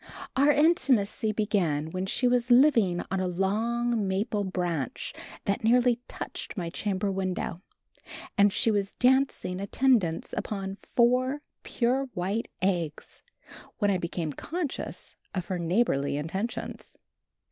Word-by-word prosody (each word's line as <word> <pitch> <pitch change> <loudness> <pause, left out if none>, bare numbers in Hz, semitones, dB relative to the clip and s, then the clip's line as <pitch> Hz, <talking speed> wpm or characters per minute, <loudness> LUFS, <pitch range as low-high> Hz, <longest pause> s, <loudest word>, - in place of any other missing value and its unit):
Our 280 +2 +4
intimacy 265 -8 +3
began 175 -8 0
when 185 +2 -3
she 250 +5 +1
was 245 0 +2
living 240 -9 +5
on 195 - 0
a 185 - 0
long 220 +4 0
maple 205 +2 0
branch 175 - -3 0.3
that 200 +4 -1
nearly 245 +1 +4
touched - - -6
my 170 -3 -3
chamber 200 +1 -1
window, 185 -2 -3 0.7
and 205 -1 +5
she 225 +3 +2
was 200 -2 -1
dancing 255 -7 +2
attendance 200 -6 +1
upon 195 -1 -4 0.2
four 255 +4 +3 0.2
pure 255 +3 0
white 195 +6 -1 0.2
eggs 170 -5 -2 0.6
when 205 -2 +2
I 185 - +1
became 170 -3 -3
conscious 325 - -5 0.2
of 180 -2 -2
her 185 -2 -3
neighborly 165 -6 +1
intentions. 190 +10 -5
200 Hz, 125 wpm, -28 LUFS, 185-240 Hz, 0.7 s, living